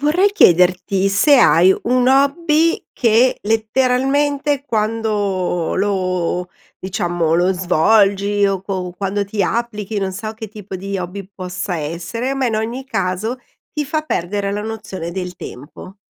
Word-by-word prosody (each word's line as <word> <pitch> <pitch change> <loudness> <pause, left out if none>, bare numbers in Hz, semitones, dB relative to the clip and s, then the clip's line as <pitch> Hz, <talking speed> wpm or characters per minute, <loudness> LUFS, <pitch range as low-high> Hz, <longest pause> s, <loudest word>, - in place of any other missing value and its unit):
Vorrei 355 +8 +2
chiederti 185 - +3
se 280 +9 +4
hai 185 -4 +6
un 250 +1 +2
hobby 300 +4 +2
che, 235 +1 +3
letteralmente, 265 +6 +1
quando 210 - -1
lo 185 -3 -1 0.3
diciamo 175 -3 -1
lo 175 +2 +3
svolgi 200 +3 +2
o 195 -1 -1
co 185 -2 -4
quando 200 +1 -1
ti 200 +1 -2
applichi, 215 -1 -2
non 190 -1 -2
so 215 +3 -5
che 220 0 -8
tipo 205 -2 -8
di 195 +2 -4
hobby 185 +2 -6
possa 185 0 -4
essere, 170 - -3
ma 270 -1 0
in 225 -2 0
ogni 230 +4 -3
caso 220 -1 -2 0.3
ti 300 -2 -2
fa 310 +2 -2
perdere 200 - -2
la 205 +1 -3
nozione 205 -6 -6
del 180 -1 -5
tempo. 145 +8 -10
205 Hz, 140 wpm, -18 LUFS, 185-245 Hz, 0.3 s, hai